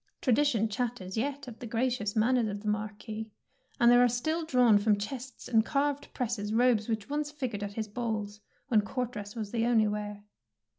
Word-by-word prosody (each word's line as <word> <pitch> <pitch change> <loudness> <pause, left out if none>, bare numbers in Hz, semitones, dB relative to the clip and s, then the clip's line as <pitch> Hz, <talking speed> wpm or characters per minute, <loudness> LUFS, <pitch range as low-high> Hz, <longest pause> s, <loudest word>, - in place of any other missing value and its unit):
Tradition 250 -3 +2
chatters 215 -4 -3
yet 280 +4 -2
of 235 -3 -9
the 240 - -6
gra 230 +3 +1
cious 215 -5 -2
manners 235 +1 +3
of 205 -1 -4
the - - -5
Marquis, 215 +1 -3 0.5
and 240 -1 +6
there 245 0 +7
are - - +6
still 315 +8 -1
drawn 250 -8 +5
from 210 0 +3
chests 255 +5 -6
and 225 -3 +4
carved 285 +2 -1
presses 220 -4 -2
robes 235 -2 +3
which 220 -2 -2
once 295 +1 -2
fig 285 -5 -4
ured 205 - -4
at 205 0 -4
his 220 0 -3
balls, 210 -2 -3 0.3
when 225 -6 +4
court 250 +3 -3
dress 205 -1 -7
was 215 -3 -4
the 230 0 +1
only 225 -3 +4
wear. 210 0 -4
230 Hz, 200 wpm, -30 LUFS, 210-250 Hz, 0.5 s, there